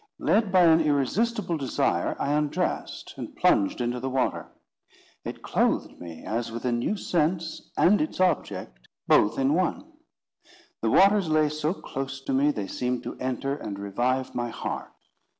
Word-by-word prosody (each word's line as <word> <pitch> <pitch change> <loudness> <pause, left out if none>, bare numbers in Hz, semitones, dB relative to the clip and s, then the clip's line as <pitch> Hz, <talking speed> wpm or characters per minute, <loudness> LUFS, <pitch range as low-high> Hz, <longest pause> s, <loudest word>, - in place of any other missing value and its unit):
Led 215 -4 +2
by 185 -1 +5
an 165 -1 +6
irresistible 170 - 0
desire, 135 -4 0
I 140 - 0
undressed, 150 -1 -2
and - - -7
plunged 100 +5 +2
into 120 +1 -1
the 130 +2 -3
water. 130 -1 -1 0.7
It - - -7
clothed - - 0
me 85 -2 -9
as 115 +1 -2
with 115 +2 -6
a 125 - +1
new 120 - 0
sense 165 -2 -1
and 205 +8 +5
its 310 - -3
object 150 - -1 0.2
both 105 +2 +4
in 135 +2 +2
one. 185 - 0 1.0
The - - +1
waters 195 -2 +5
lay 155 -1 +3
so 155 +3 -1
close 135 -4 -5
to 135 - -3
me, 140 +3 +3
they 105 -9 -2
seemed 125 +4 -2
to - - -6
enter 130 +2 -2
and 100 -8 -6
revive 120 +6 -1
my 120 -1 -2
heart. - - -5
140 Hz, 160 wpm, -26 LUFS, 120-170 Hz, 1.0 s, an